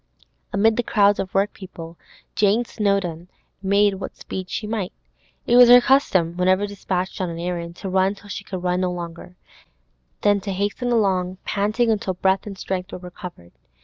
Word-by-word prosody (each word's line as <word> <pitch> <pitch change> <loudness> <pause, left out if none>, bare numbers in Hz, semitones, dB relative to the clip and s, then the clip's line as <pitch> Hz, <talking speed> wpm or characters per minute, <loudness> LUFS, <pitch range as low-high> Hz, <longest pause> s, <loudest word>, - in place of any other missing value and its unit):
Amid 215 +3 +3
the - - +3
crowds 205 -3 +3
of 190 - -3
workpeople, 190 -4 -3 0.4
Jane 215 +3 +2
Snowdon 195 -7 -1 0.3
made 200 +1 +3
what - - -6
speed 185 -1 -6
she 215 - -3
might. 210 -4 -3 0.5
It 240 - +4
was 245 -1 +9
her 245 0 +10
custom, 190 -11 +2
whenever 185 +2 +3
dispatched 190 -2 -3
on 185 - -1
an 165 - -6
errand, 170 -1 -4
to 195 - -7
run 190 +1 +2
till 205 - -16
she - - -5
could 185 -2 -6
run 180 0 +1
no 180 -1 0
longer, 175 0 -7 0.9
then 205 -1 +3
to 195 0 -4
hasten 205 +6 -2
along 190 -5 +1
panting 215 +4 +1
until 200 -3 -1
breath 190 +2 +1
and 195 -2 -7
strength 185 0 -4
were - - -5
recovered. 180 - -10
195 Hz, 175 wpm, -22 LUFS, 180-205 Hz, 0.9 s, her